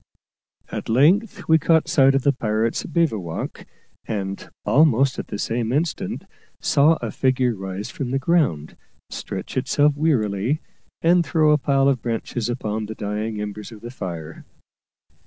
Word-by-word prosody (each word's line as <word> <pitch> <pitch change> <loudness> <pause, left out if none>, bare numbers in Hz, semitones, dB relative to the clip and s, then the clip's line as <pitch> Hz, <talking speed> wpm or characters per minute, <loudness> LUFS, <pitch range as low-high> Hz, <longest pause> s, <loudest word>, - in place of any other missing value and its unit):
At - - -5
length 170 - +3
we 160 0 +5
caught 160 +1 +3
sight 135 -1 +4
of 135 - +1
the 140 - +3
pirates' 110 -2 -1
bivouac, 110 - -2 0.4
and, 100 -3 -4 0.2
almost 135 -3 +3
at - - -5
the - - -5
same 115 +2 -2
instant, 155 +4 -2 0.4
saw 145 +3 +4
a - - -2
figure 130 -2 +1
rise 95 0 -6
from 135 -4 -4
the 135 - 0
ground, 135 - +1 0.4
stretch - - -6
itself 145 0 +2
wearily, 125 -4 +1 0.4
and 175 +1 +5
throw 155 -2 +3
a 150 - +4
pile 135 -1 +2
of 135 -4 +2
branches 120 0 -3
upon 110 -3 -3
the 110 - -6
dying 105 +1 -3
embers 105 +1 -6
of 110 -2 -12
the 120 - -8
fire. 85 -9 -7
125 Hz, 150 wpm, -22 LUFS, 105-145 Hz, 0.4 s, we